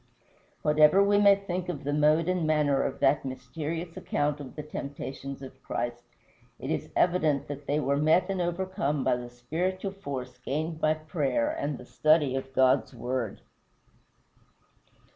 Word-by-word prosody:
Whatever 150 +6 +6
we 205 0 +4
may 200 -1 +7
think 185 -2 -4
of 150 -4 -4
the 145 +1 -1
mode 155 +2 +3
and 180 -3 +1
manner 150 -3 +3
of - - -2
that 135 +1 +3
mysterious 160 +5 -5
account 145 0 -1
of 140 -3 -9
the 150 - -5
temptations 140 -2 -6
of 130 0 -11
Christ, 120 -1 -3 0.6
it - - -5
is - - -2
evident 160 -6 +2
that 145 0 -7
they 145 +1 +1
were 140 -1 +1
met 160 +5 +3
and 195 -2 -1
overcome 175 -5 -1
by - - +3
the 120 0 -6
spiritual 175 +11 -3
force 130 -9 -6
gained 155 +5 -3
by 155 0 +3
prayer 155 -6 -1
and 145 -1 -3
the 125 - -11
study 155 -1 +3
of 135 0 -4
God's 130 0 +3
word. 120 -2 -3
150 Hz, 160 wpm, -28 LUFS, 135-170 Hz, 0.6 s, may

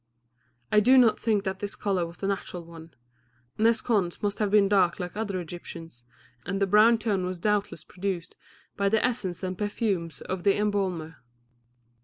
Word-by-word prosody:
I 210 - +6
do 255 +5 +5
not 240 -4 +5
think 215 -3 +1
that 190 -1 -3
this 205 0 -4
colour 190 -4 -1
was 170 +1 -12
the - - -5
natural 185 -3 -4
one; 165 -1 -13 0.6
Nes 225 0 +3
Khons 200 -7 0
must 205 -1 -1
have 210 -2 +1
been 205 -1 +5
dark 195 -3 +2
like 180 0 -5
other 205 -3 -2
Egyptians, 165 -6 -9 0.4
and 195 +3 -3
the 200 - +3
brown 215 +4 +5
tone 210 -4 -1
was 180 0 -3
doubtless 205 -4 -1
produced 180 -1 -5 0.4
by 200 0 +1
the 220 +3 +2
essences 195 -8 -2
and 185 0 -2
perfumes 195 -6 -2
of 185 -1 -4
the 200 -1 +3
embalmer. 190 -6 -1
195 Hz, 175 wpm, -27 LUFS, 175-210 Hz, 0.6 s, I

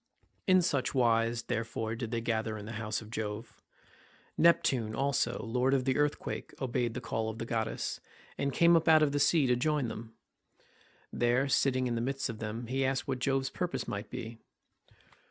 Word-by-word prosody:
In 185 -1 +5
such 140 -6 0
wise, 115 -1 +2
therefore, 110 0 -3
did 115 0 -4
they 115 0 -2
gather 110 -1 -1
in 105 - -8
the 110 - -6
house 110 0 -2
of 110 - -13
Jove. 110 0 -5 0.7
Neptune 130 -9 +3
also, 135 -3 +1
lord 125 +4 +1
of 130 -2 0
the 130 -1 +2
earthquake, 145 0 -2
obeyed 120 -3 -1
the - - -3
call 110 0 -2
of 110 - -6
the 115 - -4
goddess, 110 -1 -2 0.4
and 140 0 -1
came 170 +4 +5
up 165 0 +2
out 155 -1 +7
of 145 - +2
the 145 - 0
sea 155 0 +4
to 125 -1 +3
join 140 -1 0
them. 110 0 -8 1.0
There, 120 +3 +2
sitting 130 -1 +2
in 120 - -1
the 115 - -1
midst 135 +2 -2
of 110 -2 -6
them, 110 +2 -4
he 135 +3 -1
asked 130 0 0
what 130 -2 -2
Jove's 135 +1 0
purpose 180 -1 -3
might 100 +2 -4
be. 115 -2 -7
120 Hz, 190 wpm, -31 LUFS, 115-135 Hz, 1.0 s, out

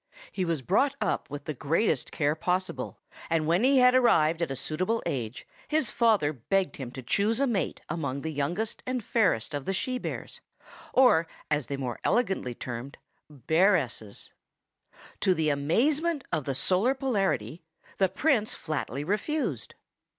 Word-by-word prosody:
He 185 - -1
was 165 -5 -1
brought 265 - +2
up - - -1
with 145 0 -7
the 155 - -3
greatest 150 - 0
care 145 -2 +1
possible, 180 +4 -2 0.3
and 165 -2 +1
when 170 +7 +2
he 270 +1 +5
had 250 0 +6
arrived 170 -11 +4
at 170 - 0
a 135 - -3
suitable 185 - -2
age, 120 -3 -3 0.2
his 300 -7 +1
father 210 -11 +3
begged 185 - -1
him 130 -4 -5
to 130 - -7
choose 210 - +1
a 275 - +3
mate 225 -8 -1
among 140 -4 -3
the 160 +1 -4
youngest 175 +10 -2
and 255 -2 -2
fairest 185 - +1
of 145 -2 -3
the 195 - -1
she 255 +6 -1
bears, - - -6 0.5
or, 210 -11 +5 0.2
as 150 -3 +1
they 140 - -3
are 135 - -6
more 125 -3 -3
elegantly 190 - 0
termed, 120 +3 -6 0.3
bearesses. 150 - 0 0.9
To 185 - +3
the 155 -2 +1
amazement 275 - +1
of 150 - -1
the 135 - -2
Solar 195 - +2
Polarity, 195 - -1 0.4
the 190 -1 +4
Prince 255 - +1
flatly 145 -3 -3
refused. 215 - -2
170 Hz, 160 wpm, -28 LUFS, 145-225 Hz, 0.9 s, had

